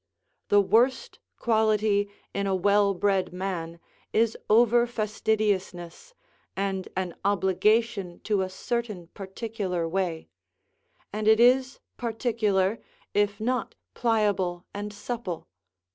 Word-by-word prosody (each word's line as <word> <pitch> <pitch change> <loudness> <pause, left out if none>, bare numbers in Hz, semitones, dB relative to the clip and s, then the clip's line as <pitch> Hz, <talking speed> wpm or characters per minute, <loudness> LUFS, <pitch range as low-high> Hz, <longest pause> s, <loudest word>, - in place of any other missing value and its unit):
The 205 0 +6
worst 245 - +2 0.2
quality 215 -2 +2 0.2
in 200 0 -1
a 190 - +1
well 200 +1 +3
bred 190 -1 +1
man 175 -3 -4 0.3
is 225 0 +2
over 235 +2 +5
fastidiousness, 215 - -2 0.4
and 195 -1 -2
an 185 -2 -2
obligation 200 0 +1
to 205 -3 0
a 185 - -2
certain 210 -3 -4
particular 195 -3 -4
way; 170 -2 -2 0.9
and 215 0 -2
it 220 0 +6
is 255 +2 +4 0.2
particular, 220 -4 0 0.3
if 205 0 +1
not 245 +2 -1 0.2
pliable 205 -6 0
and 205 +1 -5
supple. 205 -4 -5
205 Hz, 105 wpm, -27 LUFS, 190-225 Hz, 0.9 s, The